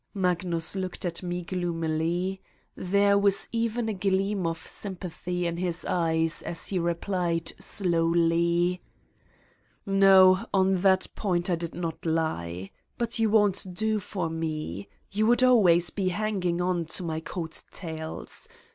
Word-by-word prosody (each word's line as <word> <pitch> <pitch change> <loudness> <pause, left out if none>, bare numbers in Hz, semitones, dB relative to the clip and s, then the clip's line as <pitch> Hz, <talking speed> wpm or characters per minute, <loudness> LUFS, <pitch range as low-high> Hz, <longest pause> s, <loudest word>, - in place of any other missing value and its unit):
Magnus 180 -2 0
looked 185 0 -4
at 170 -1 -3
me 175 -1 -3
gloomily 175 +1 -2 0.3
There 200 +2 +2
was 200 -1 +2
even 230 0 -1
a 220 - -1
gleam 195 -1 0
of 165 0 -4
sympathy 180 -2 -4
in 170 0 -2
his 175 -1 -1
eyes 165 -2 +1
as 165 - -4
he 190 - 0
repk'ed 170 0 -2
slowly: 170 0 +2 0.4
' - - -35
' - - -40
No, 195 -1 +6
on 190 -1 +3
that 190 0 +3
point 180 -3 0
I - - +3
did 170 0 -5
not 165 0 -4
lie. 95 - -2 0.3
But 235 -1 -2
you 225 -1 +3
won 210 -1 +5
't 185 -1 -8
do 220 +1 0
for 185 -3 -3
me. 155 - -4 0.2
You 215 +2 +1
would 240 +2 +4
always 180 -10 +5
be 195 -2 -2
hanging 185 -3 -1
on 175 -2 0
to 160 +3 -5
my 160 -2 -2
coat 160 0 -5
tails. 160 - -6
180 Hz, 145 wpm, -27 LUFS, 165-195 Hz, 0.4 s, No